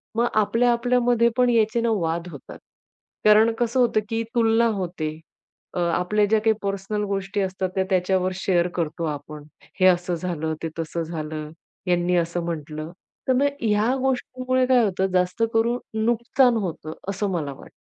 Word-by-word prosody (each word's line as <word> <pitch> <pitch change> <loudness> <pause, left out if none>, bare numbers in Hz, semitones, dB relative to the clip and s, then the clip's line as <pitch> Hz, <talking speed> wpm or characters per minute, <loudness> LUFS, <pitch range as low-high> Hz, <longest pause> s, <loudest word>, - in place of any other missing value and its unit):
मग 235 +1 +2
आपल्या-आपल्यामध्ये 235 +2 +3
पण 250 -1 +4
याचे 230 0 +2
ना 230 -1 +1
वाद 170 +1 -2
होतात. 140 - -11 0.7
कारण 215 +2 +6
कसं 240 +1 +1
होतं, 235 -3 +3
की 225 0 -1
तुलना 230 0 +3
होते, 170 -4 -3 0.6
अ, - - -3
आपल्या 180 +5 +1
ज्या 220 +2 +2
काही 220 0 +3
पर्सनल 200 +1 -2
गोष्टी 195 +1 -2
असतात, 190 0 -2
त्या 190 - +2
त्याच्यावर 185 0 +1
शेअर 180 -2 +1
करतो 165 -1 -2
आपण. 150 0 -6 0.4
हे - - +6
असं 180 -1 +2
झालं, 160 -2 -3
ते 165 - -1
तसं 165 +1 -3
झालं, 155 -2 -5 0.4
यांनी 175 0 +2
असं 170 0 -1
म्हटलं. 155 -1 -5 0.4
तर 260 - +4
मग 265 +3 +2 0.2
ह्या 220 +3 +2
गोष्टीमुळे 255 0 0
काय 250 -2 +5
होतं? 190 -1 0
जास्त 180 +5 +1
करून 235 +2 +2 0.3
नुकसान 240 +1 +3
होतं, 165 -6 -4 0.2
असं 200 +1 -1
मला 150 -6 -2
वाटतं. - - -15
195 Hz, 160 wpm, -23 LUFS, 170-230 Hz, 0.7 s, कारण